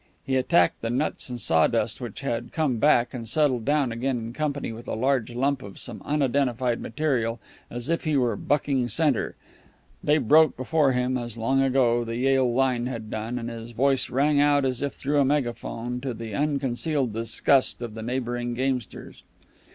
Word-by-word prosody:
He 135 - 0
attacked 125 -9 +3
the 115 - -2
nuts 130 +3 -1
and 125 -1 -5
sawdust 80 -7 +1
which - - -6
had 115 0 -3
come 150 -7 0
back 125 -2 +3
and 115 -3 -5
settled 130 -4 +1
down 145 -3 +2
again 125 +3 -1
in 115 0 -6
company 145 -3 -2
with 115 +2 -10
a - - -2
large 130 0 +1
lump 135 +1 0
of 100 -5 -10
some - - -4
unidentified 130 -4 0
material, 120 -4 -1 0.3
as 120 +1 -5
if 165 +1 0
he 155 -2 +1
were 120 -4 +1
bucking 140 0 0
center. 145 +1 0 0.7
They 150 +1 +3
broke 155 +2 +4
before 140 +1 +2
him 125 0 0
as, 120 -1 -6
long 130 +4 +1
ago, 125 -3 +2
the 115 0 -4
Yale 130 -1 +2
line 125 -1 +1
had 115 -4 -6
done, 110 +3 -3
and 115 -1 -4
his 115 0 -7
voice 135 +3 +1
rang 145 +3 +2
out 145 -1 +4
as 130 -1 -1
if 140 -1 -2
through 145 +1 0
a - - +5
megaphone, 125 -3 -2
to 130 -3 -4
the 115 -1 -7
unconcealed 140 -1 -1
disgust 115 +4 +1
of 115 -2 -6
the 110 - -7
neighboring 120 0 -3
gamesters. 130 -3 -3
125 Hz, 180 wpm, -25 LUFS, 120-140 Hz, 0.7 s, a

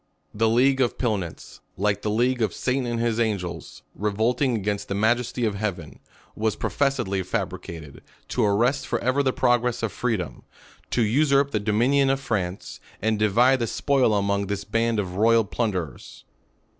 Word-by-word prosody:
The 110 +1 +2
league 130 +4 +3
of 120 - +1
Pilnitz, 100 -9 -3 0.2
like 100 +1 0
the 105 - -2
league 120 +3 +1
of 110 -5 0
Satan 130 -1 -1
and 120 -1 -2
his 115 -1 0
angels, 100 -6 -3
revolting 115 +5 0
against 105 -1 -2
the 100 - -3
Majesty 120 +3 +1
of 110 - 0
heaven, 90 -8 -4 0.4
was 110 0 0
professedly 120 -9 -1
fabricated, 90 -6 -5 0.3
to 125 - 0
arrest 120 +7 +1
forever 130 +3 +1
the 135 -2 +1
pro 120 -1 +3
gress 125 0 -3
of 110 - -1
freedom; 100 - -3 0.5
to 120 - +1
usurp 140 +4 +3
the 110 - 0
dominion 120 +7 +2
of 135 0 +1
France, 100 -8 -3 0.2
and 110 0 0
divide 120 +6 +4
the 115 - -1
spoil 130 -3 +2
among 100 0 0
this 100 0 -3
band 115 +1 0
of 90 -2 -4
royal 115 +1 +4
plunder 100 -7 -2
ers. - - -15
110 Hz, 165 wpm, -24 LUFS, 100-125 Hz, 0.5 s, divide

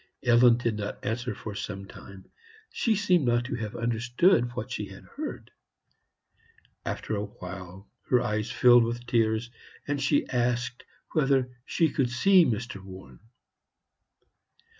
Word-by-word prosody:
Ellen 120 -1 +6
did 115 -3 -1
not 105 0 -5
answer 120 +3 -2
for 110 - -7
some 100 -1 -5
time; 95 -1 -13 0.5
she 225 -2 +1
seemed 185 -5 +2
not 120 0 +2
to - - -3
have 110 -3 -5
understood 120 - +2
what 125 0 -5
she - - -3
had - - -12
heard. - - -7 1.3
After 110 - -3
a 105 0 -2
while 95 -1 -10 0.2
her 125 - +5
eyes 110 -3 -1
filled 120 -1 +6
with 120 +1 -3
tears, 115 -1 +1 0.4
and 145 -1 -1
she 145 +1 +2
asked 120 0 -1 0.3
whether 135 -4 +1
she 165 -3 +1
could 130 -3 0
see 180 +9 +5
Mr. 110 -3 -3
Warren. 95 -9 -12
120 Hz, 140 wpm, -27 LUFS, 105-125 Hz, 1.3 s, Ellen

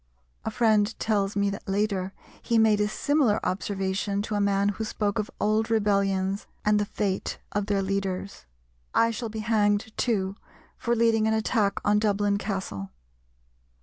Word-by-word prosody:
A - - -2
friend 220 -1 +2
tells 205 -2 0
me 200 0 +1
that 195 - -7
later 195 -2 0 0.3
he 230 - +1
made 220 -2 +4
a 210 - +2
similar 265 -1 +2
observation 195 +1 -1
to 215 - -4
a 205 - +1
man 200 0 +2
who 205 +2 -3
spoke 210 -1 -1
of 210 - -2
old 215 +2 +1
rebellions 200 -3 +1 0.2
and 210 0 +4
the 205 - +1
fate 200 -2 -2
of 205 0 -1
their 200 -2 +1
leaders, 195 - -3 0.5
"I 230 0 +4
shall 230 0 -4
be 220 0 -5
hanged, 215 -1 +1
too, 200 -5 0 0.4
for 235 0 0
leading 225 -1 +3
an 220 - +2
attack 215 -2 +1
on 210 0 +4
Dublin 205 -1 +1
Castle." 190 - -4
205 Hz, 160 wpm, -26 LUFS, 195-220 Hz, 0.5 s, made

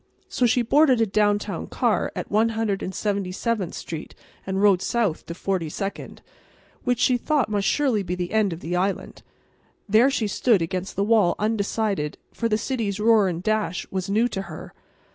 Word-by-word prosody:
So 250 - +1
she 240 +1 +2
boarded 270 0 +4
a 225 - +4
downtown 205 0 0
car - - 0
at - - -5
One 220 +2 +3
Hundred 210 -3 -1
and - - -3
Seventy 200 -2 -2
seventh 205 -2 -2
street 160 -2 -7 0.3
and 190 0 -1
rode 200 -3 +4
south 225 -8 -1
to 170 - -6
Forty 180 -3 -2
second, 195 +5 -6 0.6
which 245 -1 +1
she 250 +1 +3
thought 280 -2 0
must 205 -2 0
surely 265 -8 +2
be 180 -1 -3
the 180 -1 -4
end 215 -3 +2
of 165 +1 -6
the 175 +2 -3
island. 190 +2 -2 0.7
There 220 +6 +5
she 255 -5 -1
stood 210 +1 +2
against 185 +2 -4
the 200 - +1
wall 210 -4 +3
undecided, 210 -6 -1 0.2
for 230 - -1
the 215 - +2
city's 220 -5 -2
roar 215 -2 +4
and 175 -1 -3
dash 215 -4 -1
was 190 0 -3
new 220 +4 +3
to 195 - -3
her. 155 - -9
205 Hz, 185 wpm, -24 LUFS, 190-225 Hz, 0.7 s, There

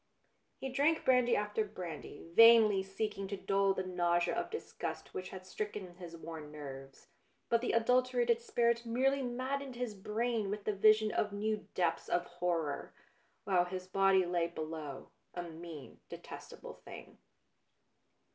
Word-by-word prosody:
He 265 - -4
drank 290 +5 +2
brandy 250 -2 +4
after 210 +1 0
brandy, 175 -7 -8
vainly 225 -2 +8
seeking 195 +1 -3
to 200 +1 -4
dull 195 0 +2
the 185 - -1
nausea 175 -1 +1
of - - -2
disgust 450 - -6
which 185 0 -5
had 185 -1 -9
stricken 200 -2 -5
his 170 -2 -9
worn 160 -2 -8
nerves; 135 -2 -9 0.4
but 235 -1 +3
the 245 - -1
adulterated 240 0 +3
spirit 235 0 +1
merely 265 +4 +1
maddened 260 +2 -3
his 240 -3 -3
brain 215 +1 -1
with 205 0 -3
the 210 - 0
vision 215 +1 +5
of 210 - 0
new 210 +1 -2
depths 170 -2 0
of 175 - +1
horror, 175 -4 -2 0.5
while 180 -2 +3
his 185 0 -5
body 190 0 +3
lay 175 -1 +1
below, 155 -4 -6 0.2
a 175 - -3
mean, 165 -3 -9
detestable - - -10
thing. - - -11
195 Hz, 145 wpm, -34 LUFS, 175-235 Hz, 0.5 s, vainly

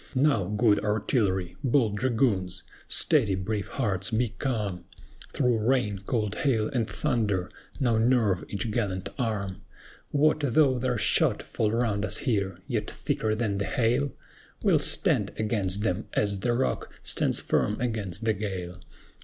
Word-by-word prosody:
Now, 130 -7 +3
good 105 +2 +2
Artillery! 105 -4 0
bold 120 -6 +2
Dragoons! 110 -6 0 0.2
Steady, 115 - +3
brave 95 +1 -3
hearts, 100 -7 -1
be 115 +1 +1
calm! 105 - -3 0.5
Through 125 -4 +1
rain, 110 -4 +1
cold 105 -5 0
hail, 115 -7 +1
and 120 -6 -1
thunder, 100 -6 -1 0.3
now 120 -4 +2
nerve 115 -5 +2
each 105 +2 -3
gallant 100 -5 -2
arm! 100 -6 -2 0.5
What 155 +2 +3
though 140 -2 +3
their 125 -1 0
shot - - +2
fall 105 -1 -1
round 110 -3 0
us - - 0
here, 100 -8 -1
yet - - -2
thicker 110 -1 -1
than 105 -3 -1
the 100 - -1
hail? 125 +4 +1 0.5
We'll - - +4
stand - - +2
against 105 -3 -1
them, 95 0 -1
as 100 -2 0
the 120 +5 0
rock 130 +2 -1
stands - - +1
firm 105 - 0
against 110 -4 -3
the 110 - +3
gale. 90 -3 -5
110 Hz, 145 wpm, -27 LUFS, 100-125 Hz, 0.5 s, We'll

